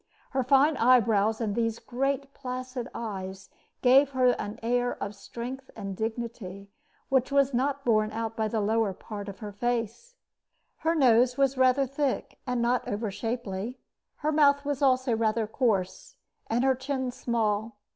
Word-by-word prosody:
Her 265 - +1
fine 275 +3 +4
eyebrows 225 -3 +4
and 220 -3 -1
these 230 0 0
great 275 +3 -2
placid 255 -1 -5
eyes 190 -4 -6 0.3
gave 265 +2 +6
her 255 -1 +4
an 210 -3 -2
air 245 +1 +1
of 200 - -4
strength 245 +6 -7
and 195 -3 -5
dignity 220 -3 -5 0.4
which 265 -1 +2
was 280 -1 +3
not 275 +3 0
borne 215 -2 +3
out 225 0 -3
by 220 -1 0
the 215 0 -1
lower 215 -1 +1
part 205 +1 -7
of 195 - -10
her 205 - -5
face. 240 - -3 0.6
Her 330 +1 0
nose 250 -3 +4
was 275 -1 +2
rather 260 +1 +4
thick 275 +1 -2
and 250 -1 0
not 245 +1 +1
over 210 0 -2
shapely. 225 +1 -4 0.4
Her 305 +1 -1
mouth 285 -2 +4
was 285 -1 -2
also 260 -3 +3
rather 220 0 +1
coarse, 210 -5 -1 0.3
and 235 +3 +1
her 265 0 +4
chin 260 0 -3
small. 220 -3 -1
240 Hz, 155 wpm, -28 LUFS, 220-265 Hz, 0.6 s, gave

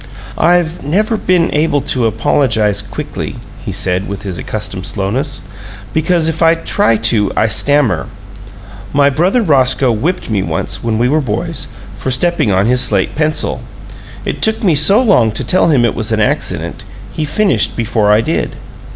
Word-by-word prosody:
"I've 175 -1 +1
never 210 +10 0
been 180 -4 +1
able 150 -1 +1
to 125 -3 0
apologize 110 -1 +1
quickly," - - -6 0.3
he - - -4
said, 95 +1 0
with 100 - -6
his 95 -4 -5
accustomed - - -4
slowness, 120 +10 -2 0.5
"because 160 +1 +1
if 160 0 -2
I 165 0 +5
try 165 - +1
to 110 -2 +1
I - - +3
stammer. 110 - +2 0.9
My 140 0 +3
brother 185 - +1
Roscoe 135 - +3
whipped 160 +12 -2
me 100 -3 +1
once, 95 +3 -3
when 115 -2 -1
we 120 +2 +2
were 155 +4 +1
boys, 110 -7 -3 0.3
for - - -3
stepping 130 -3 +1
on 95 +1 +2
his 125 +2 +3
slate 100 -3 +1
pencil. 155 0 -1 0.6
It - - -4
took 220 0 +1
me 180 -5 +3
so 155 +9 +5
long 195 - +3
to - - -3
tell 185 - +2
him 130 -6 +3
it 115 - 0
was - - -3
an - - +1
accident, - - -2 0.3
he 155 - -3
finished 150 - +1
before 110 -3 +1
I 105 +1 +4
did." - - -2
130 Hz, 170 wpm, -14 LUFS, 110-165 Hz, 0.9 s, I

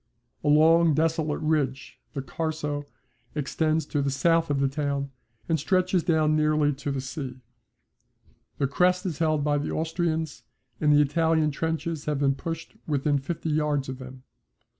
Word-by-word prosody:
A - - -2
long 160 +1 +5
desolate 160 -1 0
ridge, 145 -4 -1
the 135 -3 -4
Carso, 150 -1 -3 0.5
extends 155 +2 0
to 145 -1 -1
the 140 - 0
south 165 +4 +2
of 140 -1 +1
the 135 - +3
town, 140 -1 -2 0.4
and 160 -1 +1
stretches 185 +3 +2
down 155 -2 +2
nearly 150 -1 +2
to 140 +1 -5
the 140 -1 -1
sea. 130 0 -5 1.2
The 140 - +1
crest 180 +6 +2
is 170 -5 -3
held 155 -3 +1
by 145 0 +2
the 145 - -3
Austrians 160 -1 -2 0.4
and 150 -1 +3
the 150 0 +6
Italian 160 +1 +2
trenches 160 +1 -3
have 150 -1 0
been 135 -1 +2
pushed 165 +3 -6
within 145 -1 +1
fifty 160 +3 -3
yards 150 -3 0
of 130 0 -6
them. 130 0 -10
150 Hz, 160 wpm, -26 LUFS, 140-160 Hz, 1.2 s, the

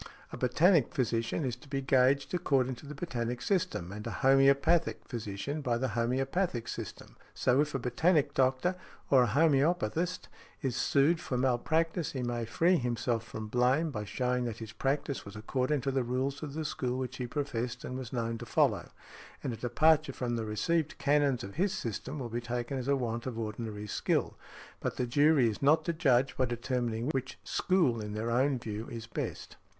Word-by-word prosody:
A - - -6
botanic 155 +4 +3
physician 120 +2 -1
is 125 -2 -1
to 135 - -17
be 135 0 -1
gauged 135 +2 +3
according 135 -7 +1
to 140 - -12
the 150 - -7
botanic 125 -6 -3
system, 180 - -1
and 105 +1 -6
a - - -2
homœopathic 140 +5 +3
physician 115 +5 -4
by 120 -4 0
the 130 +2 -1
homœopathic 125 - -1
system: - - -7 0.2
so 130 +3 +3
if 150 -1 -2
a - - +3
botanic 145 +4 +2
doctor, 130 +8 +2 0.4
or 135 -2 +7
a 125 - +3
homœopathist, 160 - +2 0.4
is 130 -3 -1
sued 140 +5 +3
for 125 - -3
malpractice 160 +7 +1
he 130 -2 -3
may 120 -1 -2
free 170 +10 +3
himself 120 -2 -1
from 110 -1 -7
blame 125 +8 +2
by 105 -5 -4
showing 125 +3 -1
that 115 -2 -4
his 110 -1 -7
practice 140 +5 -1
was 100 +1 -10
according 130 +6 -1
to 135 +2 -1
the 135 0 +1
rules 130 +3 -2
of 150 -2 -6
the 160 0 -3
school 125 -4 -2
which 130 -1 -4
he 125 - -3
professed 125 -3 -3
and 125 - -5
was 130 -3 -6
known 115 -2 -2
to - - -7
follow, - - +2 0.5
and 125 - -2
a - - -6
departure 145 +5 +3
from 120 -2 -2
the 115 -1 -2
received 150 +9 0
canons 140 -2 +2
of 100 +5 -8
his 190 +2 +2
system 125 +5 -4
will 130 -4 -4
be 120 +1 -3
taken 120 +2 -3
as 130 - -5
a 140 - +3
want 120 -2 -3
of 120 -3 -4
ordinary 110 -1 -4
skill. 105 - 0 0.4
But - - -3
the 125 - 0
jury 145 +1 +4
is 105 -2 -3
not 155 +3 +4
to 170 - 0
judge 135 -5 +2
by 130 - +3
determining 120 0 -2
which 130 -2 -3
school 160 - +1
in 105 0 -5
their 110 +2 -2
own 130 +3 +2
view 110 -1 -5
is 115 -1 -6
best. 115 - -5
130 Hz, 190 wpm, -31 LUFS, 120-145 Hz, 0.5 s, or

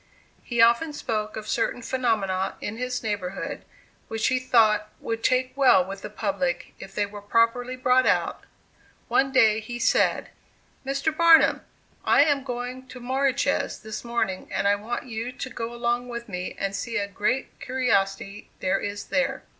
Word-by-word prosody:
He 235 -2 +2
often 235 +7 +3
spoke 215 -6 -3
of 215 0 -6
certain 240 +1 -1
phenomena 215 -7 0
in 205 +2 -5
his 250 0 -3
neighborhood, 200 -3 -4 0.4
which 225 -1 0
he 255 -1 +1
thought 215 -4 +3
would 225 0 -4
take 255 0 +1
well 255 -10 +5
with 195 +1 -7
the - - -6
public, 195 -4 -2
if 195 - -10
they 205 - +1
were 205 0 -10
properly 230 +4 +1
brought 255 0 +3
out. - - +1 0.7
One 270 0 +2
day 220 -5 +5
he 240 +2 -6
said: - - +2 0.5
"Mr. 275 +3 -1
Barnum, 335 0 +6 0.4
I 280 - +5
am 285 -3 +1
going 250 0 -5
to 250 - -10
Moriches 265 +2 0
this 220 0 -6
morning, 230 -5 -2
and 200 - 0
I 200 - +5
want 210 +5 -4
you 230 0 -4
to 260 - -6
go 230 0 -4
along 240 +1 -1
with 235 0 -6
me 180 -3 -5
and 195 0 -2
see 230 +4 -3
a 200 -1 -1
great 205 +6 -2
curiosity 205 -5 -1
there 185 +1 +1
is 205 0 -4
there." - - -1
230 Hz, 165 wpm, -25 LUFS, 205-255 Hz, 0.7 s, Barnum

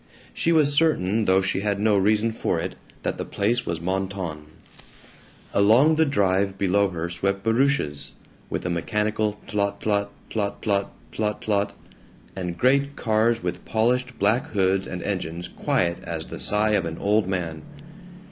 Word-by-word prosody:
She 165 - +1
was 150 -3 +4
certain, 115 - +2
though 95 0 +4
she 95 - 0
had 100 0 -1
no 105 0 +3
reason 105 +3 +2
for 110 - -1
it, - - -3 0.3
that - - -2
the - - -1
place 115 +5 -1
was 85 -1 -2
Mentone. 95 -3 -3 1.1
Along 115 +10 +5
the 160 0 +3
drive 95 -6 +1
below 100 +1 +2
her 85 -2 -3
swept 100 +3 -2
barouches, 115 - +1 0.4
with - - -3
a - - 0
mechanical 105 +4 -1
tlot 100 -1 -1
tlot, 100 -1 0 0.2
tlot 100 -2 -2
tlot, 100 -2 +1 0.3
tlot 105 -1 -2
tlot, 100 -1 0 0.6
and 90 -2 -4
great 140 +4 +2
cars 110 0 +1
with 90 0 -3
polished 125 +3 0
black 115 +9 +2
hoods 95 -1 +2
and 90 - -5
engines 90 -3 -3
quiet 85 -1 0
as 80 -2 -4
the - - -7
sigh 105 +1 +2
of 100 -5 +2
an 80 0 -4
old 105 -1 +2
man. 85 -4 -3
100 Hz, 155 wpm, -24 LUFS, 95-110 Hz, 1.1 s, Along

